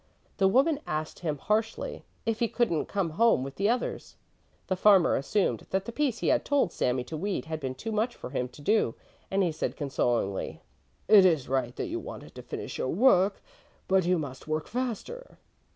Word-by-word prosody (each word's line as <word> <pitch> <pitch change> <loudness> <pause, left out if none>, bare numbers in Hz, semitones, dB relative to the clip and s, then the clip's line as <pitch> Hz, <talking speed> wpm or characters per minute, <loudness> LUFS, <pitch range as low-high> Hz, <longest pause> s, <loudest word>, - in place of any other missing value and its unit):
The 195 - +4
woman 275 +8 +3
asked 155 0 -3
him 155 -4 -2
harshly, 215 +7 -2 0.2
if 225 -1 -1
he 235 - +2
couldn't 220 -11 0
come 195 -5 -1
home 225 - +3
with 135 0 -7
the 200 +2 +2
others. 245 +1 -2 0.5
The 185 - -1
farmer 190 -2 +5
assumed 190 +9 0
that 190 +1 -1
the 235 - -5
piece 270 -2 0
he - - 0
had - - +3
told 285 - +1
Sami 125 0 0
to 155 - -7
weed 195 +5 -2
had 160 -1 -4
been 130 -3 -4
too 225 - -5
much 220 +3 0
for - - -8
him 125 -2 -1
to 135 +4 -15
do, 210 - +2 0.3
and 195 0 +2
he 175 - +1
said 155 - -3
consolingly: 120 -8 -1 0.5
"It 205 -3 +8
is 160 -8 +3
right 130 -2 -1
that - - -3
you - - -3
wanted - - -9
to - - -9
finish - - -6
your 130 - -1
work, 195 - +3 0.4
but 190 0 +3
you 180 +1 +2
must 140 -4 -6
work 155 0 -1
faster." 255 - -5
185 Hz, 200 wpm, -28 LUFS, 145-220 Hz, 0.5 s, It